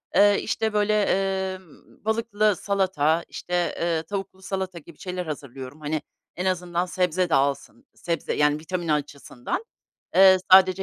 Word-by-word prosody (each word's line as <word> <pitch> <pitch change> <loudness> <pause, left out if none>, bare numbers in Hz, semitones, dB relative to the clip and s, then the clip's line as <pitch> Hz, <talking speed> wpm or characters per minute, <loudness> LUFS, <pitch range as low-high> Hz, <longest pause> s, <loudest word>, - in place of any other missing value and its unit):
Eee, 205 0 +6
işte, 220 0 -1
böyle, 210 0 +2 0.5
emm, 185 +1 -16
balıklı 215 -2 +1
salata, 175 -5 +1
işte, 175 -1 -2
eee, 165 -1 0
tavuklu 195 +1 -6
salata 190 -2 -4
gibi 155 0 -15
şeyler 180 -1 -4
hazırlıyorum. 135 -2 -7
Hani, 150 0 -2 0.3
en 180 - -3
azından 180 -1 0
sebze 180 -1 0
de - - +3
alsın. 140 - -1
Sebze, 170 -3 -3
yani, 150 0 +2
vitamin 175 +1 -4
açısından, 150 - -3 0.5
eee, 190 0 +8 0.2
sadece 190 0 +7
180 Hz, 140 wpm, -25 LUFS, 155-195 Hz, 0.5 s, eee